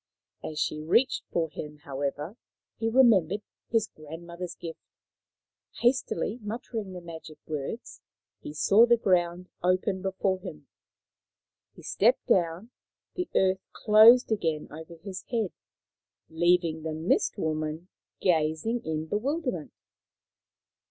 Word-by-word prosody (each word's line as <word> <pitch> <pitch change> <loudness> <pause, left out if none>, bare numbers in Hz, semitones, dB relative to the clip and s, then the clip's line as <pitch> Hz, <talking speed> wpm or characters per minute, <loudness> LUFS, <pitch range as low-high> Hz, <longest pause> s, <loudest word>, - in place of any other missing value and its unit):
As 155 - -6
she 150 0 -1
reached 205 +12 +2
for 165 -1 +1
him, 150 -1 -7
however, 145 +6 -4 0.4
he 225 - +1
remembered 210 -6 +4 0.3
his 225 -2 +2
grandmother's 170 +2 -8
gift. 165 -1 -8 1.0
Hastily 245 -2 +1
muttering 215 -2 -5
the 180 - -7
magic 160 -2 -10
words, 155 - -5 0.4
he - - -8
saw 200 +10 +5
the 235 0 +5
ground 180 -3 +1
open 185 +2 +1
before 190 0 0
him. 75 - -9 1.1
He - - -14
stepped 235 +5 +2
down. 175 +5 +1 0.4
The 360 -1 -3
earth 190 0 +3
closed 225 +3 +7
again 160 -8 0
over 160 +2 -9
his 185 +3 -7
head, 225 -6 0 0.8
leaving 170 -1 +2
the 160 0 -3
Mist 160 +3 +1
woman 155 +2 -2 0.3
gazing 165 +7 +1
in 155 0 -2
bewilderment. 250 - -2
180 Hz, 115 wpm, -28 LUFS, 160-215 Hz, 1.1 s, closed